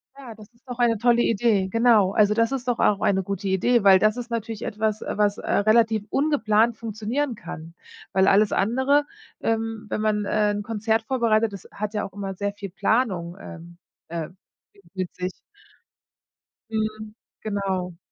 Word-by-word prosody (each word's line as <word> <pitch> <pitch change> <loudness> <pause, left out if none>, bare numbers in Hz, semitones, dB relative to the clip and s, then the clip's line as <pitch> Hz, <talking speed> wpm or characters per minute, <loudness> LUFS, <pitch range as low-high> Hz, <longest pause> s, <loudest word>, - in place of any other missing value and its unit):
Ja, 265 -4 -10
das 215 -1 -14
ist 240 +3 -32
doch 245 -1 -7
eine 235 -2 +3
tolle 240 +2 +3
Idee, 210 -4 +2
genau. 230 -5 +4
Also, 210 0 +3
das 230 +2 +1
ist 260 -2 -4
doch 245 - 0
auch 205 -1 +2
eine 190 -1 +2
gute 200 +1 -4
Idee, 200 +5 +2
weil 190 -2 +7
das 215 +3 +2
ist 240 -1 -6
natürlich 225 -1 -4
etwas, 215 0 -2
was, 205 -1 +1
äh, - - -5
relativ 220 0 +3
ungeplant 235 -6 +2
funktionieren 230 +5 -3
kann. 170 -1 -9 0.4
Weil 190 +1 +3
alles 205 +1 +4
andere, 265 +7 +2 0.4
ähm 225 -1 -2
wenn - - -2
man, 210 -1 0
äh, 210 +1 +1
'n 205 0 -3
Konzert 225 +1 -1
vorbereitet, 225 -3 +1
das 195 - -10
hat 210 +1 -5
ja 210 - -1
auch 195 - -10
immer 195 -1 -5
sehr 200 +2 -3
viel 200 -1 -8
Planung, 185 -5 0
ähm, 170 -1 -11 0.3
äh, 165 -1 -5 0.4
w 200 - -22
mit 185 -1 -4
sich. 180 0 -5 1.3
Mhm. 215 -1 -3 0.3
Genau. 190 -4 -3
215 Hz, 170 wpm, -24 LUFS, 195-230 Hz, 1.3 s, weil